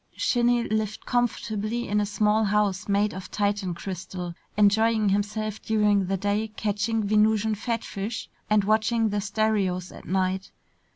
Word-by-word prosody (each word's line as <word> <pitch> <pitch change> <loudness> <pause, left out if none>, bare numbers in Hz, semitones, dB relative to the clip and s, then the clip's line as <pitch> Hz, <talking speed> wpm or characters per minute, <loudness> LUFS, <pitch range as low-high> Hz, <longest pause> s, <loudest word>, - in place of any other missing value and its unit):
Shinny 240 -1 +2
lived 215 -1 -2
comfortably 235 -1 -1
in 210 +1 +1
a 205 - -1
small 210 +1 +2
house 205 -1 +1
made 205 +1 +2
of 190 0 -7
Titan 200 -3 -1
crystal, 180 -1 -6 0.2
enjoying 215 +1 +4
himself 210 +2 -1
during 210 -3 +2
the 195 +1 0
day 205 +3 0
catching 215 +1 -1
Venusian 215 +1 +3
fatfish 225 -1 -4 0.2
and 210 -1 +4
watching 220 +2 +2
the 205 0 -1
stereos 200 -3 0
at - - -12
night. 190 0 -1
210 Hz, 135 wpm, -26 LUFS, 200-220 Hz, 0.2 s, enjoying